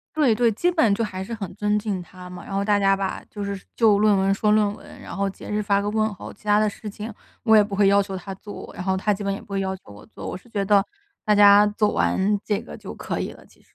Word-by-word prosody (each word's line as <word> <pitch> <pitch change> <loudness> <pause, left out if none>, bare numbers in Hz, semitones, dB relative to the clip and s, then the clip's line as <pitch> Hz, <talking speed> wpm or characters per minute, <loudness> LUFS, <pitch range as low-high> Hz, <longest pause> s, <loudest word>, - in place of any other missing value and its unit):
对 290 -7 +4
对， 235 -1 +3
基 340 +12 +1
本 315 - +3
就 230 - 0
还 190 -3 -4
是 230 - -7
很 200 -5 -5
尊 210 0 +1
敬 205 -3 -3
他 180 0 -12
嘛， 180 0 -9
然 - - -8
后 195 0 0
大 205 0 +3
家 195 -1 +3
吧， 195 -1 -3
就 205 - -5
是 200 -1 -4 0.2
就 215 -3 +4
论 210 0 +4
文 195 0 +2
说 210 +1 +1
论 210 -1 +3
文， - - -14
然 - - -8
后 200 0 0
节 195 - -8
日 210 0 -1
发 200 -1 +1
个 205 - -2
问 215 0 +1
候， 190 - -9
其 - - -20
他 210 0 +3
的 215 - +2
事 210 +1 -10
情， 210 +2 -6 0.3
我 220 -1 +4
也 210 - +6
不 200 -1 -5
会 200 0 +4
要 200 +1 +5
求 195 -1 -5
他 190 +1 -7
做， 205 +2 -10
然 180 - -5
后 190 0 0
他 200 +2 0
基 205 +1 -2
本 200 - -1
也 200 - -6
不 - - -18
会 200 -1 -2
要 190 0 -2
求 180 - -16
我 100 - -13
做。 - - -9
我 180 - -4
是 220 - -20
觉 205 -3 -1
得， 200 0 +3 0.4
大 210 - +4
家 205 0 +7
做 210 0 +1
完 205 +2 +1
这 205 -2 0
个 - - -10
就 - - -9
可 - - -4
以 - - -3
了， - - -15
其 - - -25
实。 - - -32
205 Hz, 325 characters per minute, -23 LUFS, 195-210 Hz, 0.4 s, 家